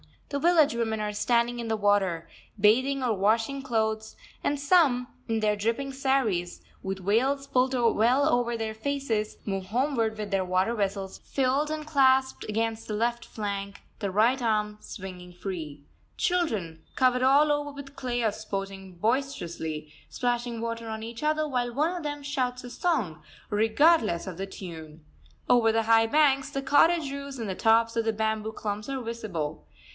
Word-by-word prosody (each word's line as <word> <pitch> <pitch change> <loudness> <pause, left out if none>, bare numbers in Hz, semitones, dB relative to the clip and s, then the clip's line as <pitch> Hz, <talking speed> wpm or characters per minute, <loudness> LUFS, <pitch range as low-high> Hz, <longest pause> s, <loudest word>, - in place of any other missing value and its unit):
The 280 - -2
village 315 -2 +4
women 225 -2 -1
are 210 0 -2
standing 240 +2 +1
in 235 - -4
the 220 0 0
water, 195 -5 +1 0.3
bathing 260 +7 +3
or 240 -3 +2
washing 225 +7 +1
clothes; 220 -4 -1 0.3
and 290 0 0
some, 280 -5 +3 0.2
in 225 -1 0
their 210 -1 +2
dripping 230 +7 -1
saris, 265 -10 0 0.2
with 190 -1 -5
veils 265 +7 +2
pulled 260 -1 +1
well 240 +3 +3
over 240 -4 +1
their 220 -1 -3
faces, 225 -3 -2
move 195 -2 -3
homeward 230 -1 0
with 210 -1 -5
their 195 -1 +1
water 185 +5 +1
vessels 195 -3 -2
filled 275 +3 0
and 310 0 -4
clasped 265 -3 +3
against 225 +1 -1
the 215 - -3
left 235 +2 -1
flank, 200 -2 -5 0.2
the 200 - -2
right 230 +7 +3
arm 210 -2 0
swinging 180 -4 -9
free. 165 -6 -6 0.3
Children, 215 - -1
covered 250 -1 +3
all 280 +3 +5
over 290 0 0
with 280 0 -10
clay, 245 -4 -2
are 220 - +2
sporting 195 -2 -6
boisterously, 170 - -2 0.2
splashing 240 -1 -2
water 230 0 -4
on 220 0 -5
each 230 0 -7
other, 310 0 +1
while 245 -3 -1
one 315 +6 +1
of 350 - -5
them 290 -1 -4
shouts 255 -3 -2
a 245 - -8
song, 225 - -1 0.3
regardless 220 - +3
of 185 -3 -6
the 195 +1 -4
tune. 160 -5 -9 0.4
Over 235 -2 +5
the 225 0 +2
high 225 0 +4
banks, 275 0 +3
the 275 -1 -4
cottage 295 +2 +4
roofs 280 -1 -6
and 225 -4 -4
the - - -1
tops 225 +3 +3
of 230 - +1
the 225 - +1
bamboo 220 0 -1
clumps 210 +2 -4
are 270 -1 -2
visible. 205 -10 -4
230 Hz, 170 wpm, -27 LUFS, 205-270 Hz, 0.4 s, all